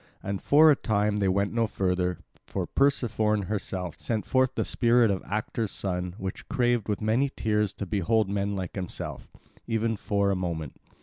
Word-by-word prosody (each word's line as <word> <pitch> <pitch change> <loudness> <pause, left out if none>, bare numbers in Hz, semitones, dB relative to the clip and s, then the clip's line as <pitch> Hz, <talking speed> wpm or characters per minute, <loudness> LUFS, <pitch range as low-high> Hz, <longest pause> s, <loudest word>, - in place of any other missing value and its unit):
And 100 0 -3
for 155 +2 +6
a - - +5
time 105 -3 0
they 100 -2 +1
went 100 +2 +1
no 115 -1 +2
further, 90 -2 0 0.3
for - - -2
Persephone 110 -6 +1
herself 95 -3 -4
sent 110 -3 -2
forth 130 -1 +2
the - - 0
spirit 120 -2 +3
of 95 - -1
Actor's 110 +1 -2
son 90 -2 -3
which 95 -3 -6
craved 120 -3 +1
with 105 - -1
many 115 +6 +2
tears 105 -5 0
to 100 - -5
behold 105 +2 +1
men 100 0 -1
like 95 -3 -4
himself, 95 -3 -6 0.4
even 115 0 0
for 100 -1 0
a - - +1
moment. 85 -6 -3
105 Hz, 175 wpm, -27 LUFS, 95-115 Hz, 0.4 s, for